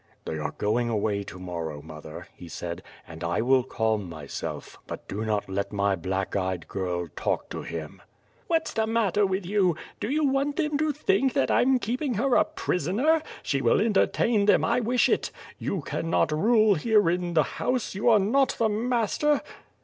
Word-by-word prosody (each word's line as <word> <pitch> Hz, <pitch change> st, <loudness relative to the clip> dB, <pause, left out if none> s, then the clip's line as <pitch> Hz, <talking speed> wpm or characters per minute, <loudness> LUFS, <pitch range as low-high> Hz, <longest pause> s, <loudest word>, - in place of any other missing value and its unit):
"They 80 Hz, -, -3 dB
are 75 Hz, -, -2 dB
going 120 Hz, +3 st, 0 dB
away 105 Hz, -2 st, 0 dB
to 95 Hz, -, -9 dB
morrow, 85 Hz, -4 st, -5 dB
mother," 75 Hz, 0 st, -10 dB
he 90 Hz, -, -12 dB
said, -, -, -6 dB, 0.3 s
"and 80 Hz, 0 st, -9 dB
I 85 Hz, +5 st, 0 dB
will 130 Hz, +2 st, +4 dB
calm 110 Hz, -6 st, -1 dB
myself, 75 Hz, -4 st, -7 dB
but -, -, -7 dB
do 105 Hz, +3 st, -4 dB
not 105 Hz, -2 st, -1 dB
let 100 Hz, +1 st, -3 dB
my 100 Hz, -1 st, +1 dB
black 95 Hz, +2 st, -3 dB
eyed 95 Hz, -3 st, -2 dB
girl 90 Hz, -3 st, -3 dB
talk -, -, -2 dB
to -, -, -4 dB
him." 80 Hz, -2 st, -7 dB, 0.5 s
"What's 325 Hz, -1 st, 0 dB
the 220 Hz, 0 st, 0 dB
matter 210 Hz, -3 st, +2 dB
with 190 Hz, 0 st, -2 dB
you? 185 Hz, -3 st, +2 dB, 0.2 s
Do 210 Hz, -, -3 dB
you 300 Hz, +2 st, +1 dB
want 275 Hz, +1 st, +1 dB
them 300 Hz, -3 st, 0 dB
to 310 Hz, 0 st, +2 dB
think 265 Hz, -3 st, +1 dB
that -, -, +1 dB
I'm 260 Hz, +1 st, +4 dB
keeping 250 Hz, +3 st, -2 dB
her 245 Hz, +5 st, +1 dB
a -, -, +5 dB
prisoner? 230 Hz, -, +1 dB, 0.2 s
She 135 Hz, -1 st, 0 dB
will 115 Hz, -, +3 dB
entertain 210 Hz, 0 st, +2 dB
them, 205 Hz, -, +5 dB
I -, -, +2 dB
wish 245 Hz, +1 st, +2 dB
it. -, -, +1 dB, 0.3 s
You 195 Hz, -, -2 dB
can 165 Hz, +3 st, -4 dB
not 160 Hz, -, +2 dB
rule 215 Hz, +6 st, +4 dB
here 205 Hz, +3 st, +3 dB
in 175 Hz, 0 st, 0 dB
the 155 Hz, -, +5 dB, 0.2 s
house, 250 Hz, -2 st, 0 dB
you 200 Hz, +5 st, +1 dB
are 225 Hz, -, +7 dB
not 235 Hz, +7 st, +2 dB
the 225 Hz, -1 st, +2 dB
master!" 240 Hz, +6 st, +1 dB
180 Hz, 190 wpm, -26 LUFS, -, 0.5 s, are